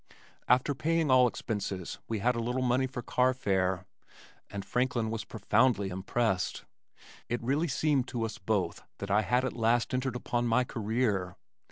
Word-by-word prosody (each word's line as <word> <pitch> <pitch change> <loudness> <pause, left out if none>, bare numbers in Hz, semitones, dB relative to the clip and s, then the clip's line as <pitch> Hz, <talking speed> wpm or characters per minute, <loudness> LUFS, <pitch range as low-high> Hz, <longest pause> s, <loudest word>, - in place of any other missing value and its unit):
After 125 +4 +3
paying 155 +1 +1
all 130 -1 +7
expenses 100 -6 -4
we 115 - -1
had 120 +4 +1
a - - -1
little 125 +3 -1
money 130 +1 +2
for 125 -2 -6
carfare, 95 -9 +1 0.6
and 100 -1 -6
Franklin 125 -3 0
was 110 -1 -4
profoundly 110 -1 +2
impressed. 95 +1 -1 0.6
It 120 - 0
really 140 +7 +1
seemed 140 -2 +1
to 120 -2 -3
us 110 - -6
both 95 -3 -1 0.2
that 100 0 -5
I 105 +2 +4
had 125 +6 +1
at - - -2
last 115 +1 +1
entered 130 0 -1
upon 120 0 -1
my 115 +2 +3
career. 110 -5 -1
120 Hz, 160 wpm, -30 LUFS, 105-130 Hz, 0.6 s, all